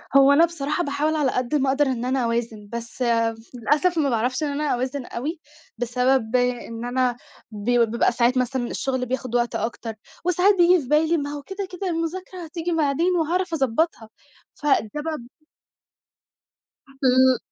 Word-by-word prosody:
هو 275 0 +7
أنا 310 +4 +6
بصراحة 315 0 -2
باحاول 290 +2 0
على 290 -4 +1
قد 255 +4 -1
ما 275 -2 +2
أقدر 280 +2 +3
إن 250 -3 -2
أنا 260 -1 0
أوازن، 230 -3 -2
بس 235 +2 -7 0.5
للأسف 295 +8 +1
ما 290 -3 +2
باعرفش 250 +4 0
إن 300 - +1
أنا 295 +1 0
أوازن 255 +1 -3
أوي، 300 +7 -4 0.4
بسبب 250 0 +1
إن 245 -2 -1
أنا 245 0 0 0.3
بي 235 +3 +2
بيبقى 230 +1 +1
ساعات 245 +2 +2
مثلًا 250 -1 0
الشغل 260 0 -2
بياخد 255 -1 -3
وقت 240 0 +1
أكتر، 225 0 -3 0.3
وساعات 360 +3 +4
بييجي 350 0 +5
في - - -10
بالي: 315 +3 +3
"ما 285 -2 -3
هو 290 0 -5
كده، 385 +4 -5
كده 375 +1 -4
المذاكرة 350 +2 -4
هتيجي 335 +2 -4
بعدين 325 +3 +1
وهاعرف 350 +3 0
أضبّطها." 270 -3 0 0.5
فده 295 -1 +2 0.2
بب 305 -6 -5 1.6
ل 260 -1 +3
270 Hz, 160 wpm, -23 LUFS, 245-320 Hz, 1.6 s, هو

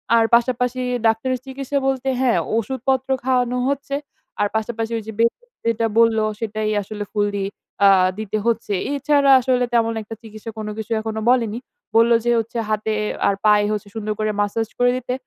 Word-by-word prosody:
আর 230 - +5
পাশাপাশি 250 +1 +1 0.3
ডাক্তারের 250 +4 +1
চিকিৎসা 275 +1 -3
বলতে, 270 0 -1
হ্যাঁ, 250 -3 +3 0.2
ওষুধপত্র 260 +3 -1
খাওয়ানো 250 -1 +1
হচ্ছে। 280 0 -2 0.4
আর 205 - +3
পাশাপাশি 225 +1 -2
ওই 225 - -5
যে 220 - -4
বেড 230 0 +4
রেস্ট 485 0 -31
যেটা 230 0 +1
বলল, 230 -1 +4 0.2
সেটাই 215 -1 -2
আসলে 205 +1 -6
ফুললি 205 -2 0 0.4
অ্যা 200 - +7 0.3
দিতে 215 0 -2
হচ্ছে। 230 -3 0 0.2
এছাড়া 285 -1 +3
আসলে 250 0 +1
তেমন 230 -1 +2
একটা 220 +1 -8
চিকিৎসা 220 0 -9
কোন 215 -1 -5
কিছু 220 0 -6
এখনো 220 0 -4
বলেনি। 235 -3 +2 0.4
বললো 230 +1 +6
যে 240 - +3
হচ্ছে, 230 +1 -5
হাতে 215 0 0 0.3
আর 200 - +2
পায়ে 210 -1 +5
হচ্ছে 210 -1 -3
সুন্দর 215 -1 -2
করে 215 0 0
ম্যাসাজ 210 +2 0
করে 245 0 +4
দিতে। 250 0 -4
230 Hz, 175 wpm, -21 LUFS, 215-255 Hz, 0.4 s, অ্যা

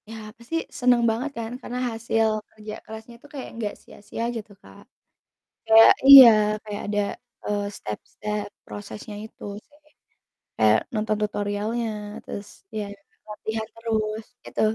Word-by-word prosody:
Ya, 215 -1 -9
pasti 235 +7 -7 0.2
seneng 245 -2 +4
banget 245 +6 -2
kan, 225 0 -4
karena 250 +1 -5
hasil 225 0 +1 0.2
kerja 215 -1 -9
kerasnya 220 +2 -10
itu - - -15
kayak 275 -3 -6
nggak 215 -3 -3
sia-sia 205 +2 -8
gitu 215 -2 -7
Kak. 95 0 -16 0.9
Kayak 225 0 +9
iya, 275 -3 +13 0.4
kayak 210 -1 -5
ada, 205 0 0 0.5
eee, 205 0 -1
step-step 210 - -5 0.2
prosesnya 105 - -8
itu 220 - -15 0.2
sih. 295 - -25 0.8
Kayak - - +5 0.2
nonton 215 0 0
tutorialnya 210 +3 -2 0.4
terus 200 0 -7 0.3
ya 210 - -2 0.4
lihat-lihat 220 +1 -5
terus 220 -1 -2 0.2
gitu, - - -4
220 Hz, 130 wpm, -24 LUFS, 210-230 Hz, 0.9 s, iya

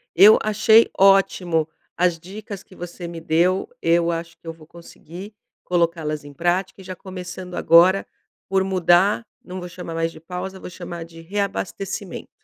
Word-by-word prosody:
eu 205 +5 +8
achei 220 +1 +4
ótimo 185 -4 +3 0.3
as 175 -2 +1
dicas 200 +2 -9
que 185 - -18
você 175 0 -8
me 170 -1 -8
deu, 175 +3 +1
eu 170 0 +2
acho 165 0 -5
que 165 - -17
eu 165 - -4
vou 160 -1 -17
conseguir 170 +4 -12 0.3
colocá-las 165 -4 -1
em 145 0 -12
prática 180 +5 -1
e - - -12
já 185 0 -7
começando 180 -1 -8
agora 180 +4 +5 0.4
por 190 0 +2
mudar, 190 +3 +3 0.2
não 185 0 -7
vou 180 0 -7
chamar 180 -2 -8
mais 165 0 -1
de 160 - -13
pausa, 185 +3 -7
vou - - -8
chamar 175 -2 -8
de 165 0 -13
reabastecimento. 195 +1 -4
180 Hz, 165 wpm, -22 LUFS, 165-190 Hz, 0.4 s, eu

